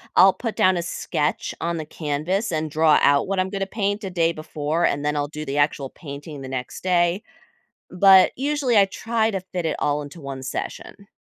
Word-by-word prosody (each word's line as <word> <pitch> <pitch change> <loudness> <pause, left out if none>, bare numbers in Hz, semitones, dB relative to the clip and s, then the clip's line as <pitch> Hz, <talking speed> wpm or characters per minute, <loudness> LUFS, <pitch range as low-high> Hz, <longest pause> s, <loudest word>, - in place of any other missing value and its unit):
I'll 190 +1 +7
put 230 -2 -5
down 185 -1 +3
a 170 - -2
sketch 150 -2 -2
on 170 0 -2
the 155 - -5
canvas 160 +8 -2
and 155 -1 -2
draw 155 0 +4
out 140 +3 +4
what 195 -1 -1
I'm 185 0 0
gonna 195 -1 -2
paint 205 +1 -2
a 190 - -3
day 170 -2 +2
before, 155 +1 -2
and 145 +1 0
then 150 0 0
I'll 145 0 -1
do 155 +1 -7
the 140 +2 -3
actual 145 -2 +1
painting 145 -1 -9
the 130 - -7
next 130 -1 -5
day. 180 +1 +2 0.7
But 190 0 +6
usually, 275 -4 +1
I 195 - +6
try 225 +2 -1
to 195 -2 -3
fit 175 -3 -2
it 155 - -1
all 145 0 0
into 145 +4 -10
1 135 -1 -7
session. 200 +8 -6
170 Hz, 210 wpm, -23 LUFS, 150-195 Hz, 0.7 s, I'll